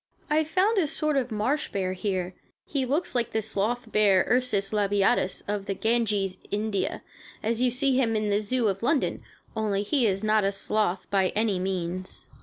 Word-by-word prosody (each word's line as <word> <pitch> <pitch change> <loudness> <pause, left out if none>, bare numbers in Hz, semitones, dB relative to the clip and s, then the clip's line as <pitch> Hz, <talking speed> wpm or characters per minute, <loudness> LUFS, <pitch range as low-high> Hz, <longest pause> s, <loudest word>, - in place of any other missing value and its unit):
I 310 +1 +4
found 380 +7 +2
a 325 - +2
sort 305 +1 -1
of 255 -3 0
marsh 220 +8 -1
bear 185 -2 -1
here. 185 -2 -2 0.3
He 270 -3 -1
looks 305 +7 -1
like 235 -2 -1
the 220 - +1
sloth 225 +3 -1
bear 200 -3 +4
(Ursus 220 -6 +1
Labiatus) 200 -1 +1
of 205 -1 -3
the 195 - -1
Ganges, 210 -4 0
India, 210 -1 -2 0.4
as 230 +2 0
you 250 - +4
see 260 +2 +2
him 230 -4 +2
in 215 -1 0
the 200 - +3
Zoo 235 +2 0
of 195 -1 -1
London, 275 +4 0 0.3
only 205 -2 0
he 245 +2 +2
is 195 0 -1
not 215 -1 +3
a 195 - +2
sloth, 195 -1 -1
by 190 -2 +3
any 210 -3 +1
means. 185 -1 -4
215 Hz, 185 wpm, -26 LUFS, 195-250 Hz, 0.4 s, I